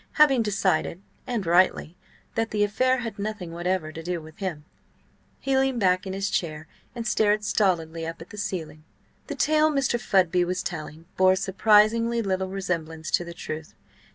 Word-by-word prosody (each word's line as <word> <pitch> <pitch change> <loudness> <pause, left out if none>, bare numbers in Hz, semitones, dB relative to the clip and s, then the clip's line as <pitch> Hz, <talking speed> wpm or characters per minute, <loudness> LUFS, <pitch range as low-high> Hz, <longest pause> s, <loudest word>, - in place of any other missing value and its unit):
Having 280 -5 +5
decided 195 -5 0 0.3
(and 235 -6 -2
rightly) 175 -1 +3 0.4
that 225 0 -1
the 210 -1 +1
affair 255 +5 +1
had 225 -4 -6
nothing 200 -4 -4
whatever 175 -1 -2
to 160 - -8
do 175 +1 -3
with 155 0 -14
him, 170 -7 -4 0.7
he 270 -1 0
leaned 265 -2 +2
back 185 -1 +2
in 190 - -4
his 195 +1 -2
chair 155 -2 -2 0.3
and 235 -1 -4
stared 210 -1 +2
stolidly 165 -6 0
up 165 0 -6
at 165 - -12
the 210 - -10
ceiling. 155 -6 -4 0.4
The - - -4
tale 310 0 +3
Mr. 270 -5 +1
Fudby 180 -4 +3
was 180 +1 -2
telling 160 -3 -6
bore 185 0 +5
surprisingly 215 +4 +3
little 190 -1 -1
resemblance 165 -5 -4
to - - +2
the 170 0 -9
truth. 155 0 -7
190 Hz, 170 wpm, -25 LUFS, 165-215 Hz, 0.7 s, Having